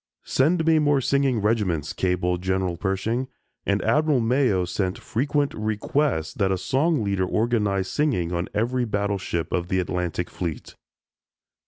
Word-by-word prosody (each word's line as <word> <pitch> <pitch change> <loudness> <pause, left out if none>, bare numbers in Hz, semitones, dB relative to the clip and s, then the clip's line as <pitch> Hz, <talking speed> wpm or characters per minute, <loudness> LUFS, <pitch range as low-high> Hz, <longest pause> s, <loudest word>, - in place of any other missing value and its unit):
"Send 160 +5 +2
me 160 -1 +5
more 145 -2 +3
singing 135 -3 +1
regiments," 100 -9 0
cabled 90 -1 0
General 95 -1 0
Pershing, 105 +8 -1 0.4
and 100 +1 +1
Admiral 150 +4 +3
Mayo 115 -6 +2
sent 95 +1 -2
frequent 145 +4 -1
requests 110 - -1
that 95 -2 0
a 95 - +1
song 135 - +1
leader 100 -2 0
organize 105 -4 +1
singing 120 - 0
on 85 +1 -2
every 120 +4 0
battleship 100 -5 -2
of 85 -1 -1
the 95 - 0
Atlantic 90 -1 -2
Fleet. 85 -4 -5
105 Hz, 140 wpm, -24 LUFS, 90-130 Hz, 0.4 s, me